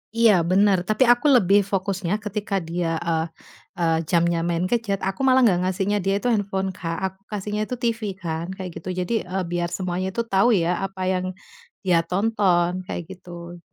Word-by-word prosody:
Iya, 230 -1 +6 0.2
benar, 200 +1 +4
tapi 215 +4 +3
aku 245 +5 +3
lebih 200 -2 +5
fokusnya 190 -1 -1
ketika 210 -1 -3
dia, 165 -1 -1
eee 160 -1 +1 0.5
eee, 165 -1 +2
jamnya 170 -1 +2
main 170 0 0
gadget, 225 -5 0
aku 195 +4 -2
malah 260 0 +5
nggak 185 -6 +4
ngasihnya 195 +2 0
dia 195 +1 +1
itu 225 - -2
handphone, 195 -3 0
Kak, 165 -1 -3
aku 190 0 -5
kasihnya 210 +1 -3
itu 250 - -3
TV 235 -1 0 0.2
kan, 165 -1 -3
kayak 185 -2 -6
gitu. 175 - -7
Jadi, 180 +5 -2
eee, 185 +1 -2
biar 175 0 0
semuanya 185 0 -2
itu 235 - +1
tahu 195 +5 +4 0.2
ya 170 - 0 0.2
apa 195 -1 -7
yang 185 0 -1 0.6
dia 175 -3 +3
tonton, 185 -3 +2 0.2
kayak 175 - -4
gitu. 175 -1 -10
190 Hz, 180 wpm, -23 LUFS, 175-205 Hz, 0.6 s, Iya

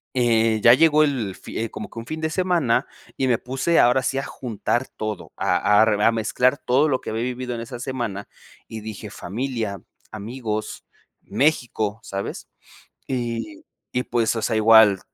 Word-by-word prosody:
eh, 115 -3 +3
ya 120 - +9
llegó 155 +2 +5
el 120 -10 -1
fi 115 0 -5
como 110 - -7
que 115 - -8
un 115 - -8
fin 155 0 -4
de 160 - 0
semana, 165 -9 +1 0.3
y 135 - 0
me 120 -3 +3
puse 135 +7 0
ahora 125 +2 +5
sí 135 +1 -1
a 135 - -1
juntar 120 +1 -2
todo, 110 -3 -6
a 105 +1 +3
a - - +6
rev 105 -2 +1
a 115 - +5
mezclar 125 +4 +1
todo 130 +4 +2
lo 130 -3 +1
que - - -6
había 110 +1 -2
vivido 125 0 -3
en 115 - -5
esa 120 +1 -7
semana, 120 -6 -4 0.4
y 110 -1 -7
dije: 105 -1 -8
"Familia, 110 -1 -4 0.3
amigos, 110 0 -5 0.4
México", 115 -7 0
¿sabes? 100 -1 -6 0.6
Y 130 - -4 0.3
y 125 - 0
pues, 115 -2 0
o 115 - -2
sea, 110 0 0
igual 110 -3 +6
120 Hz, 175 wpm, -23 LUFS, 110-130 Hz, 0.6 s, ya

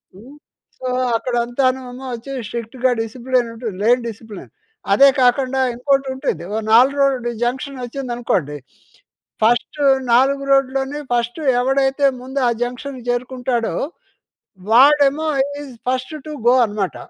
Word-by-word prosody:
హ్మ్, 245 +9 -14 0.4
సో, 255 - -6 0.3
అక్కడంతాను 250 +2 0
ఏమో 255 +2 -9
వచ్చి 240 +4 -7 0.2
స్ట్రిక్ట్‌గా 240 +2 -2
డిసిప్లిన్ 245 +1 -1
ఉంటుంది, 225 -4 -6
లేన్ 245 +2 +3
డిసిప్లిన్. 215 -2 -11 0.4
అదే 275 +6 +7
కాకండా 260 +1 +2
ఇంకోటుంటుంది. 265 -4 -1
ఓ - - -1 0.2
4 265 +5 +5
రోడ్ 260 -3 +1
జంక్షన్ 265 +2 -3
వచ్చిందనుకోండి, 240 - -3 0.9
ఫస్ట్ 240 +6 +1 0.3
4 275 +3 +3
రోడ్‌లోనే 270 +1 +1
ఫస్ట్ 240 +4 -1 0.2
ఎవడైతే 270 +2 +1 0.2
ముందు 265 +2 -4
ఆ - - +1
జంక్షన్‌కి 250 +1 -6
చేరుకుంటాడో, 245 -1 -2 1.0
వాడేమో 285 +4 +5 0.4
ఈస్ 270 -3 -10 0.2
ఫస్ట్ 255 +3 -2
టు 305 - -6 0.2
గో 245 - +6
అనమాట. 205 -3 -3
255 Hz, 115 wpm, -19 LUFS, 240-270 Hz, 1.0 s, అదే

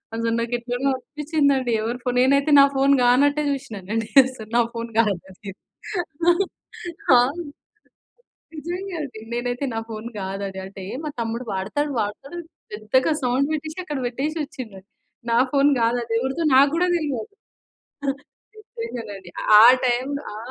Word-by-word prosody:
అసలు 230 0 -1
నాకెట్లనో 245 +3 -1
అనిపిచిందండి. 280 -1 0
ఎవరి 230 +3 -2
ఫోను? 250 -1 -1
నేనైతే 280 +3 +3
నా 275 - +9
ఫోను 275 +1 +4
కానట్టే 285 +5 +4
జూశినానండి. 225 -5 -3 0.2
అసలు 255 -5 -8
నా - - +6
ఫోన్ 230 0 -5
గాదని. 195 -2 -1 0.8
ఆ! - - +7 0.8
ఆ! - - +7 1.4
నిజంగా 355 +5 -5
అండి. 265 -6 -8
నేనైతే 245 +2 -2
నా - - -1
ఫోను 225 +1 -6
గాదు 195 +1 -4
అది. 190 0 -9
అంటే 195 0 -10 0.2
మా - - -2
తమ్ముడు 230 +2 -3
వాడతాడు. 215 +11 -2
వాడుతాడు 270 +10 -5 0.4
పెద్దగా 215 +7 +1
సౌండ్ 255 +3 +1
బెట్టేశి 310 +2 -4
అక్కడ 295 -5 -4
వెట్టేశొచ్చిండు. 265 -5 -4 0.5
నా 230 - +3
ఫోను 285 +1 +4
గాదది. 230 0 0
ఎవరిదో 265 +6 -2
నాకు 275 +2 +6
గూడా 355 +2 +2
దెలవదు. 290 - -4 1.3
అంతే 455 +2 -7
గదండీ! 200 -5 -8 0.3
ఆ - - +9 0.2
టైంలో 260 +4 -1
ఆ! - - -7
250 Hz, 130 wpm, -23 LUFS, 225-285 Hz, 1.4 s, నా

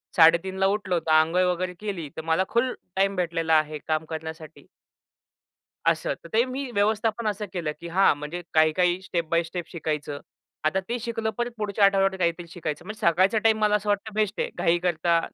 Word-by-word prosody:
3:30ला 175 +4 +4
उठलो 195 -3 0
तर, 160 -1 -3
अंघोळ 165 +4 +2
वगैरे 180 +1 -3
केली 190 -8 -4
तर, - - -3
मला 160 +3 +1
फुल 250 +2 +1 0.2
टाईम 195 +1 +2
भेटलेला 165 -2 0
आहे 155 0 -4
काम 155 0 0
करण्यासाठी. 160 -2 -8 1.2
असं. - - +1
तर 170 - -11
ते 225 +2 +5
मी 260 +1 -4
व्यवस्थापन 215 +1 0
असं 210 0 -2
केलं 170 -5 -2
की 170 - -8
हां, 185 +4 +4
म्हणजे 150 +4 -5
काही 155 0 +5
काही 180 0 +2
स्टेप 170 -3 -3
बाय 170 0 +2
स्टेप 170 +1 -6
शिकायचं. 150 -4 -3 0.5
आता 155 +5 +2
ते 240 - 0
शिकलं 225 -1 -2
परत 240 0 -1
पुढच्या 205 -1 +2
आठवड्यावर 195 -1 +3
काहीतरी 170 -1 -1
शिकायचं. 170 -2 -5
म्हणजे 215 +2 -7
सकाळचा 185 +6 +3
टाईम 220 -1 +4
मला 210 0 +4
असं 210 0 -2
वाटत 205 +2 -1
बेस्ट 210 -1 0
आहे. - - 0
घाई 170 +1 +3
करता, 170 -1 +2
180 Hz, 190 wpm, -25 LUFS, 165-210 Hz, 1.2 s, ते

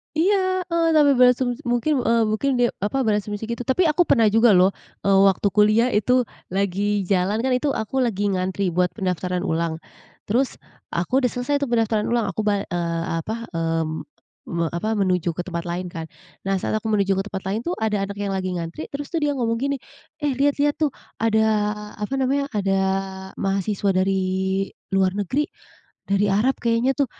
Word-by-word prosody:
Iya 370 +2 +2
heeh, 335 0 +2
sampe 295 -2 +6
berasumsi 250 0 +4
mungkin, 245 +4 +1
eee, 230 -1 +2
mungkin 220 +6 0
dia, 245 -1 +2
apa, 235 +7 0
berasumsi 210 -1 -1
gitu, 235 0 -5
tapi 265 +8 +3
aku 320 +1 +3
pernah 225 -5 +4
juga 225 -1 +5
loh, 185 +2 +5 0.3
eee, 195 -1 +4
waktu 195 +1 +2
kuliah 215 +4 +4
itu 250 +4 +3 0.2
lagi 200 +2 0
jalan 195 +4 +1
kan, 260 - +1
itu 250 +3 +1
aku 220 +5 -2
lagi 205 -5 +1
ngantri 185 0 -1
buat 180 +1 0
pendaftaran 180 -1 -2
ulang, 165 0 -1 0.5
terus 250 +5 0 0.3
aku 180 +10 0
udah 255 - +2
selesai 285 +4 -1
tuh 280 - -1
pendaftaran 225 -2 +1
ulang, 230 -4 0
aku 210 +3 -3
ba 200 -1 +1
eee, 170 -1 -2 0.2
apa, 220 +7 -4
eee, 165 -1 0 0.6
me 170 -1 -1
apa 170 +6 -2
menuju 180 -4 +1
ke 175 - -2
tempat 170 -1 -5
lain 175 +1 -3
kan. 165 -1 -5 0.4
Nah 195 - +2
saat - - 0
aku 225 - -28
menuju 200 -3 +2
ke - - 0
tempat 190 -2 -5
lain 205 +3 -1
tuh 350 - -1
ada 215 -2 +1
anak 200 - -6
yang 205 -1 -3
lagi 185 -1 -2
ngantri, 165 -2 -5
terus 285 +1 -7
tuh 335 - -1
dia 295 -1 +1
ngomong 230 -3 0
gini, 280 +3 -1 0.5
"Eh 295 -1 +1
liat 285 +1 +3
liat 290 0 +2
tuh 300 -4 +1 0.3
ada 220 0 +3 0.5
apa 210 +5 -4
namanya, 270 +1 +1
ada 195 -1 +1 0.6
mahasiswa 195 +1 0
dari 190 +1 +1 0.8
luar 190 0 +2
negeri, 265 - -1 0.6
dari 200 +1 +3
Arab 240 +7 +2
kayaknya 235 +3 +1
tuh!" 280 - +3
210 Hz, 185 wpm, -23 LUFS, 190-255 Hz, 0.8 s, sampe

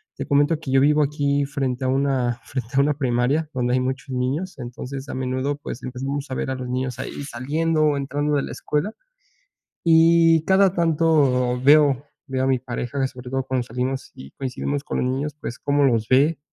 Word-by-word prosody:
te - - -5
comento 145 +2 +3
que 140 -5 -6
yo 135 - +5
vivo 150 +1 +4
aquí 145 -1 0
frente 135 -2 -2
a - - +1
una 130 -3 0
frente 125 -4 -5
a - - +4
una 145 +1 +2
primaria, 135 +3 0
donde 125 -1 0
hay 130 - +3
muchos 130 +1 -3
niños. 140 +8 -2
Entonces, 130 +3 -7
a - - -4
menudo, 130 +2 -2
pues, 130 -3 -7
empezamos 135 +2 -4
a - - -2
ver 130 - -2
a - - -2
los 125 -1 -6
niños 125 -1 -3
ahí 145 - -5
saliendo, 155 +5 -1
o 145 -1 +2
entrando 145 +2 -1
de 140 - +1
la - - -6
escuela. 150 +9 -2 0.9
Y 165 0 +5
cada 190 -1 +4
tanto 145 -7 +2
veo 145 -1 +5 0.2
veo 130 0 -1
a - - +1
mi 130 -1 +2
pareja, 125 +2 -3
sobre 125 -1 -10
todo 135 -1 -1
cuando 130 -2 -1
salimos 125 +3 -3
y 70 +1 -11
coincidimos 140 +2 -3
con - - -3
los - - 0
niños, 140 +2 -3
pues, 120 - -6
cómo 145 0 +1
los 115 -4 +2
ve, 145 +4 +3
135 Hz, 200 wpm, -23 LUFS, 130-150 Hz, 0.9 s, yo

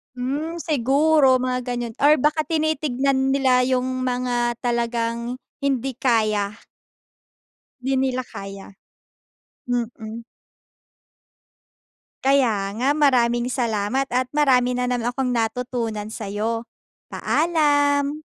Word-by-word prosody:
Hmm, 300 +7 -3
siguro 280 -1 +3
mga 255 0 -1
ganyan 240 -2 -3
or 290 -1 +4
baka 305 +1 +2
tinitignan 275 -4 0
nila 255 -2 +3
yung 255 0 -1
mga 245 -1 0
talagang 235 0 -2 0.2
hindi 270 -2 -1
kaya. 215 -5 +1 1.3
Di 265 +2 -1
nila 260 -1 0
kaya. 195 -1 -9 1.0
Mm. 230 -1 -4 2.0
Kaya 235 -8 +2
nga, 260 - +2
maraming 245 -4 +2
salamat 240 +2 -1
at 250 +1 -1
marami 260 -4 +3
na 250 0 -1
naman 245 -1 -1
akong 265 +1 -2
natutunan 230 -2 -2
sa’yo. 220 +2 -3 0.5
Paalam. 290 -2 +1
250 Hz, 95 wpm, -22 LUFS, 235-275 Hz, 2.0 s, or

